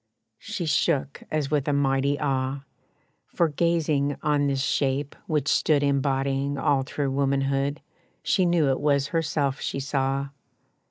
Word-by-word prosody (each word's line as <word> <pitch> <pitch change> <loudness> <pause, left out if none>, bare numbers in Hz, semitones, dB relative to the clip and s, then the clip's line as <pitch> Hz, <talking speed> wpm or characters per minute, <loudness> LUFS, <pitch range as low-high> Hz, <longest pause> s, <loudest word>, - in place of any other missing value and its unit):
She 205 -5 -4
shook 145 -2 0
as 150 -2 -2
with 145 -2 +1
a 145 - +2
mighty 140 0 +1
awe, 135 -1 -1 0.6
For, 170 -2 +1
gazing 150 -3 0
on 145 -1 +2
this 135 -1 0
shape 140 0 0
which 150 -3 0
stood 150 -2 +3
Embodying 140 0 0
all 135 0 +2
true 140 0 -2
womanhood, 140 +1 0 0.4
She 185 -2 +2
knew 170 -5 +3
it 130 - -1
was 145 -1 +2
herself 150 -4 -1
she - - -3
saw. 135 0 -1
140 Hz, 140 wpm, -25 LUFS, 135-150 Hz, 0.6 s, stood